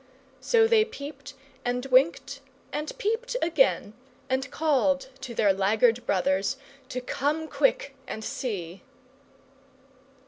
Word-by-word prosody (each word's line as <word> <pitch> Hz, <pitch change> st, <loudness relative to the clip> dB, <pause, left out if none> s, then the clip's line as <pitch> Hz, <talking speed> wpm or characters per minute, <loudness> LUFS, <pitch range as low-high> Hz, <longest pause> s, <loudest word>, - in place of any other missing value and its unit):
So 455 Hz, -2 st, +4 dB
they 450 Hz, -1 st, +5 dB
peeped, 305 Hz, -10 st, -9 dB, 0.3 s
and 245 Hz, +1 st, -1 dB
winked, 275 Hz, +1 st, +3 dB, 0.3 s
and 300 Hz, +1 st, -3 dB
peeped 460 Hz, +4 st, -1 dB
again, 335 Hz, -, +2 dB, 0.4 s
and 260 Hz, 0 st, 0 dB
called 280 Hz, -2 st, +1 dB
to 245 Hz, -3 st, -7 dB
their 205 Hz, -3 st, +4 dB
laggard 220 Hz, +5 st, +2 dB
brothers 190 Hz, +6 st, +1 dB, 0.3 s
to 255 Hz, -2 st, -4 dB
come 295 Hz, +5 st, -1 dB
quick 285 Hz, -, +1 dB
and 220 Hz, -, -5 dB
see. 190 Hz, -7 st, -4 dB
265 Hz, 110 wpm, -27 LUFS, 220-315 Hz, 0.4 s, they